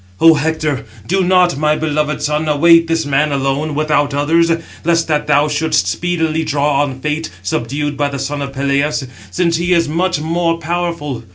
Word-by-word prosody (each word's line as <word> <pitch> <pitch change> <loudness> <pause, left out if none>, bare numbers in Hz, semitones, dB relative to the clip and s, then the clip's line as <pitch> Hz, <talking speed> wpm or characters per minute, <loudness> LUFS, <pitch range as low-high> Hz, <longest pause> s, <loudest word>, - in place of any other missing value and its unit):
"O 165 0 +7
Hector, 155 -2 -1 0.2
do 190 +1 +1
not, 180 -4 +3
my 150 0 +2
beloved 150 -1 -1
son, 150 +1 -1
await 165 +3 +5
this 165 -1 0
man 145 +1 +1
alone, 140 +2 -1
without 145 -1 0
others; 165 +4 +2 0.3
lest 165 0 +1
that 150 -2 -1
thou 150 0 +3
shouldst 155 +2 0
speedily 165 -2 -1
draw 145 -1 +1
on 135 -3 -3
fate, 150 +2 -2
subdued 140 +8 -2
by 145 0 0
the 140 - -5
son 145 +2 -3
of 140 -1 -4
Peleus; 140 +1 -1 0.2
since 170 -2 0
he 175 +2 +1
is 165 -2 +2
much 170 +2 0
more 165 +1 0
powerful. 165 -6 -3
150 Hz, 175 wpm, -16 LUFS, 145-165 Hz, 0.3 s, O